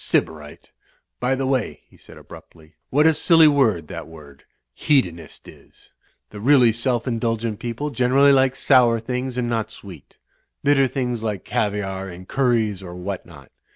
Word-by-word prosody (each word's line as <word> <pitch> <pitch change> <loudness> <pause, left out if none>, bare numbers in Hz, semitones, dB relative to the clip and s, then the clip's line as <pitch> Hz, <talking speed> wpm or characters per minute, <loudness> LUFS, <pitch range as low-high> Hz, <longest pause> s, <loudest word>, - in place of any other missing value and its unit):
"Sybarite! 75 -2 -3 0.5
By 125 +2 0
the 135 0 -3
way," 130 -3 -2
he - - -24
said - - -16
abruptly, 80 0 -16 0.2
"what 150 +3 +2
a 160 - +5
silly 165 +1 +5
word 115 - +2
that - - -7
word 75 -4 -15 0.3
'Hedonist' 85 - -1
is! - - -18 0.4
The 105 - -9
really 125 0 +4
self 115 +1 -1
indulgent 115 -2 -2
people 120 +5 -4
generally 130 +3 +3
like 130 -1 +3
sour 120 -4 +3
things 125 +2 -4
and 125 -1 -1
not 115 -2 -2
sweet; 90 -8 -14 0.5
bitter 140 -1 +3
things 125 -3 -3
like 105 -4 -4
caviare 95 -2 -3
and 90 +1 -11
curries 115 -7 0
or 90 -2 -9
what 90 +1 -6
not. 70 -6 -16
115 Hz, 155 wpm, -21 LUFS, 95-130 Hz, 0.5 s, a